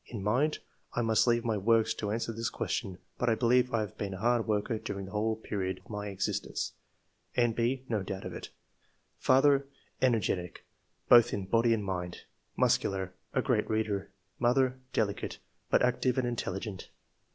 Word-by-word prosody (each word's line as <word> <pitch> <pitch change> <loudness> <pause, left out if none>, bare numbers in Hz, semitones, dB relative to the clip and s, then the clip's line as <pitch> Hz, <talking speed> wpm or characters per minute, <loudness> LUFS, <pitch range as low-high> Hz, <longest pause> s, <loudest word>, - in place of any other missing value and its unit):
In 110 -5 -6
mind 130 +9 +2 0.2
— - - -34
I 120 - +1
must 110 0 +3
leave 120 0 +3
my 110 -2 +1
works 110 +2 +3
to 105 - -4
answer 115 +2 -1
this 115 +1 -2
question; 95 -2 -3 0.2
but 125 - +2
I 115 - +3
believe 125 +2 +3
I 115 - +1
have 105 0 -6
been 100 -2 -3
a - - -6
hard 120 +3 +1
worker 110 +1 0
during 100 -2 -5
the 95 - -10
whole 110 +1 0
period 100 -4 -3
of - - -15
my 105 0 -4
existence. 100 -1 -2 0.6
[N.B. 120 +2 +1
No 110 -3 0
doubt 95 0 -5
of - - -5
it.] - - -7 0.4
" - - -43
Father 140 +1 +5 0.2
— - - -37
Energetic, 95 -7 -1 0.4
both 120 -2 +7
in 100 - -2
body 115 +4 +3
and 110 -3 +1
mind; 90 -2 -4 0.3
muscular; 95 -2 +1 0.2
a - - +2
great - - +1
reader. 110 -3 -1 0.3
Mother 130 +1 +2
— 130 - -40
Delicate, 100 -4 -1 0.3
but - - +4
active 125 0 +2
and 130 -1 +1
intelligent." 100 -4 -4
110 Hz, 185 wpm, -30 LUFS, 100-120 Hz, 0.6 s, both